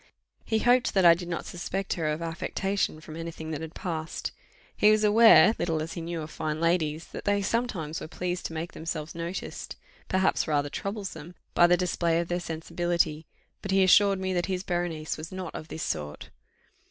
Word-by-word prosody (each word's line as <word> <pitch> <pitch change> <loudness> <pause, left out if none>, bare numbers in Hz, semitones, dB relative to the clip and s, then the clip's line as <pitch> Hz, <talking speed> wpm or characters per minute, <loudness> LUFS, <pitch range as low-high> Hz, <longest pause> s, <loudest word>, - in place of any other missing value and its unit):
He 220 - 0
hoped 245 +1 +3
that 190 -2 +4
I 170 - +10
did 175 +1 -5
not 170 -1 -3
suspect 190 +2 -3
her 160 -3 -2
of 155 +2 -1
affectation 170 +1 -2
from 155 0 -10
any 165 +1 -5
thing 160 -1 -7
that 155 0 -4
had 160 0 -7
passed; 160 -3 -4 0.4
he 210 - +5
was 215 0 +4
aware, 220 +1 +7
little 165 -2 0
as 160 +1 -4
he 170 - -5
knew 165 -1 -4
of 155 - -8
fine 155 0 -3
ladies, 165 -2 +1
that - - -7
they 205 0 +2
sometimes 190 -9 -2
were - - -6
pleased 180 +2 -3
to - - -10
make 165 +2 -4
themselves 160 -1 -5
noticed, 170 +2 -5 0.3
perhaps 190 -1 +2
rather 145 -2 0
troublesome, 190 -5 -5 0.2
by 175 - +6
the 175 0 +4
display 170 -2 +1
of 170 - -3
their 175 0 0
sensibility; 165 -1 -1 0.3
but 200 - -6
he 190 0 +4
assured 195 +1 +5
me 190 0 -1
that 175 -1 0
his 185 -1 -2
Berenice 175 -4 -2
was 160 +3 -7
not 185 -2 -6
of 155 - -7
this 160 - -5
sort. 75 0 -4
170 Hz, 200 wpm, -28 LUFS, 160-190 Hz, 0.4 s, I